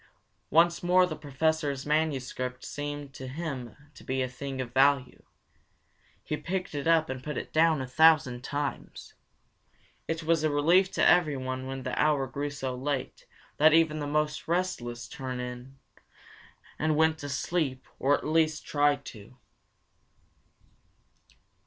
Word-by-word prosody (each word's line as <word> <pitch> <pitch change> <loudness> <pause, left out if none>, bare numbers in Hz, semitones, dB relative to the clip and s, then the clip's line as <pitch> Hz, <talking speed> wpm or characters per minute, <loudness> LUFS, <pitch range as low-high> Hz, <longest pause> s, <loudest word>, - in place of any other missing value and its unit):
Once 170 +2 +4
more 180 +1 +4
the 165 -3 -5
Professor's 145 -1 -1
manuscript 135 -4 -1
seemed 145 -1 -5
to 130 - -8
him 135 -4 -6 0.2
to - - -15
be 130 0 -1
a - - -1
thing 135 +1 -6
of 125 -2 -5
value. 135 -1 +2 1.0
He 150 - -3
picked 185 +1 -4
it 145 +1 -3
up 165 -1 +4
and 130 -2 -6
put 150 +1 -4
it - - -6
down 160 -2 +3
a 130 - -4
thousand 135 -3 +4
times. 145 +1 -5 0.9
It 165 0 -3
was 160 -1 +2
a 155 - +3
relief 170 +6 +4
to - - +3
everyone 130 -6 +2
when 135 0 -5
the - - -3
hour 150 -3 +2
grew 140 +3 -4
so 135 -3 -4
late 135 +1 -4 0.3
that 155 +1 +6
even 160 -2 +3
the 145 - -3
most 150 0 -1
restless 160 -9 -2
turned 130 -3 -6
in, 125 +2 -8 1.0
and 155 0 +1
went 160 +1 +3
to 145 - -6
sleep 140 -2 -2
or 145 +2 +3
at - - -9
least 155 0 +1
tried 145 -1 +1
to. 115 +3 -12
145 Hz, 145 wpm, -28 LUFS, 130-160 Hz, 1.0 s, that